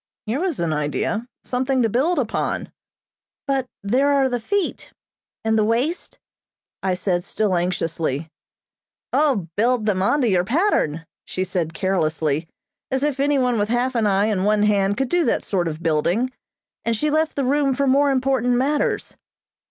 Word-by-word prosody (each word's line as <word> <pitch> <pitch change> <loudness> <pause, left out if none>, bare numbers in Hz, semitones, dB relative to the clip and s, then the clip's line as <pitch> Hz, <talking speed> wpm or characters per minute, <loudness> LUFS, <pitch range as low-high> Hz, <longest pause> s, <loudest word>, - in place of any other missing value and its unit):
Here 225 +6 -1
was 360 -4 -1
an 170 -2 0
idea. 150 +10 -1 0.2
Something 260 0 0
to - - +3
build 275 - +1
upon. 250 -6 -2 0.7
"But 270 -2 0 0.2
there 250 +8 +2
are 275 -2 +3
the 245 -1 -1
feet, 400 - -2 0.5
and 220 0 +2
the - - +3
waist?" 245 - -1 0.6
I 190 -1 0
said 180 -1 -1
still 205 -1 0
anxiously. 165 -4 -1 0.9
"O, 265 - +2
build 235 +1 +2
them 195 -3 +1
on 285 +9 +2
to 245 - +2
your 185 -4 +3
pattern," 200 - +1 0.2
she 185 - -3
said 170 -3 -2
carelessly; 160 -5 0 0.4
as 265 +1 -1
if 290 -2 0
anyone 265 -5 +2
with 205 +1 0
half 245 +2 +1
an 225 -3 +1
eye 200 0 +3
and 205 -4 0
one 210 +1 +3
hand 205 -1 +2
could 270 -2 0
do 350 -1 +2
that 235 - +1
sort 180 -4 0
of 160 +1 -5
building, 170 +10 +1 0.5
and 230 -1 0
she 300 +5 0
left 315 +1 +1
the 275 - 0
room 275 0 +2
for 280 +1 +1
more 280 +2 +4
important 260 -2 +1
matters. 280 +4 0
230 Hz, 165 wpm, -22 LUFS, 185-270 Hz, 0.9 s, more